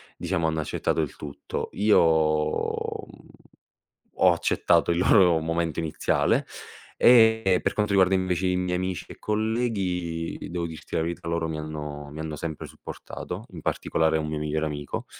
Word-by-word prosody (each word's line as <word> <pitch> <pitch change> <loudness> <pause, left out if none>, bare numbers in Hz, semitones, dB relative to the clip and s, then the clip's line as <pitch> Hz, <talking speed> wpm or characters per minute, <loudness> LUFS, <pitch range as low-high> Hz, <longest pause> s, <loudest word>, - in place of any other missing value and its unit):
diciamo, 85 -4 -1
hanno 80 0 0
accettato 75 - -1
il - - -4
tutto. 70 -2 -6
Io 105 +2 +4
uhm, 75 -2 0 1.1
ho - - +5
accettato - - +2
il 85 - 0
loro 90 -3 +5
momento 80 0 -1
iniziale 80 -2 +1 0.5
e 110 -6 +5
per - - 0
quanto 105 -1 0
riguarda 95 -1 +4
invece 95 0 0
i 90 - +1
miei 90 0 -1
amici 95 -1 -3
e - - -11
colleghi, 100 -7 -2
devo 85 -1 -2
dirti 80 -2 -11
la - - +2
verità, 85 +1 -4
loro 85 0 -1
mi 80 -1 -4
hanno 75 -1 -6
mi 75 - -9
hanno 80 -1 -4
sempre 80 0 -5
supportato, - - -8
in - - -8
particolare 80 0 0
un 75 - -3
mio 75 0 -3
migliore 75 +1 -1
amico, 75 -1 -5
85 Hz, 160 wpm, -26 LUFS, 80-95 Hz, 1.1 s, ho